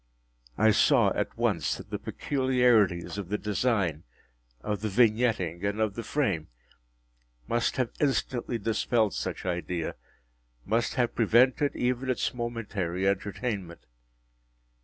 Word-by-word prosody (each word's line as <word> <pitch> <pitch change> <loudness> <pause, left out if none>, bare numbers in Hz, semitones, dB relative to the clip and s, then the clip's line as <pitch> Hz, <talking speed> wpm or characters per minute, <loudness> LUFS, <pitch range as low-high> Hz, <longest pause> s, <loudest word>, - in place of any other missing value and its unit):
I 110 +1 +5
saw - - +4
at - - -3
once - - 0
that - - -12
the - - -3
peculiarities 125 -9 +1
of 95 -3 -6
the 105 - 0
design, 100 - 0 0.6
of 105 - -3
the 110 - -1
vignetting, 110 -5 +2
and 100 +1 -1
of 110 -2 +1
the 115 - -5
frame, 100 - -1 1.0
must 120 0 0
have 125 -3 0
instantly 130 -4 0
dispelled 110 0 +1
such - - -4
idea—must 80 - -4
have 125 -2 +1
prevented 125 +5 +3
even 125 +1 -1
its 130 - 0
momentary 105 -7 -3
entertainment. 100 -2 -3
110 Hz, 115 wpm, -28 LUFS, 95-120 Hz, 1.0 s, I